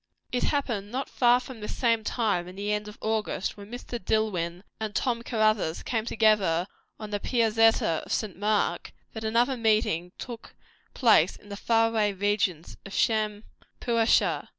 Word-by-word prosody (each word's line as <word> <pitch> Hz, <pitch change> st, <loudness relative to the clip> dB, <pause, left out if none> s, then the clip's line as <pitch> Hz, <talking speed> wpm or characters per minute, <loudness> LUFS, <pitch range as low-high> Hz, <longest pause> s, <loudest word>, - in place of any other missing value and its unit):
It 245 Hz, -, 0 dB
happened 235 Hz, -9 st, -1 dB
not 260 Hz, +2 st, -4 dB
far 245 Hz, 0 st, +4 dB
from 250 Hz, -1 st, -10 dB
this 210 Hz, -, -6 dB
same 230 Hz, -3 st, +2 dB
time 210 Hz, -6 st, 0 dB
in 180 Hz, -, -10 dB
the 205 Hz, +1 st, -3 dB
end 210 Hz, 0 st, -2 dB
of 210 Hz, -, -10 dB
August, 220 Hz, -3 st, -2 dB
when 205 Hz, 0 st, -12 dB
Mr. 240 Hz, -2 st, -7 dB
Dillwyn 180 Hz, -4 st, -1 dB, 0.2 s
and 215 Hz, -1 st, -4 dB
Tom 240 Hz, -2 st, 0 dB
Caruthers 215 Hz, -8 st, 0 dB
came 225 Hz, -3 st, -2 dB
together 210 Hz, -7 st, +2 dB, 0.3 s
on 215 Hz, -1 st, -7 dB
the 205 Hz, -, -1 dB
Piazzetta 225 Hz, -7 st, +2 dB
of -, -, -10 dB
St. 210 Hz, -5 st, -1 dB
Mark, 210 Hz, +2 st, 0 dB, 0.2 s
that 220 Hz, -, -6 dB
another 235 Hz, +4 st, +2 dB
meeting 215 Hz, -7 st, +1 dB
took 235 Hz, -3 st, -9 dB, 0.4 s
place 210 Hz, -, +4 dB
in 205 Hz, -, -17 dB
the 200 Hz, -, -5 dB
far 225 Hz, +2 st, +2 dB
away 215 Hz, -2 st, +1 dB
regions 195 Hz, -4 st, -1 dB
of 195 Hz, -, -10 dB
Shampuashuh. 220 Hz, +1 st, 0 dB
215 Hz, 160 wpm, -27 LUFS, 205-230 Hz, 0.4 s, far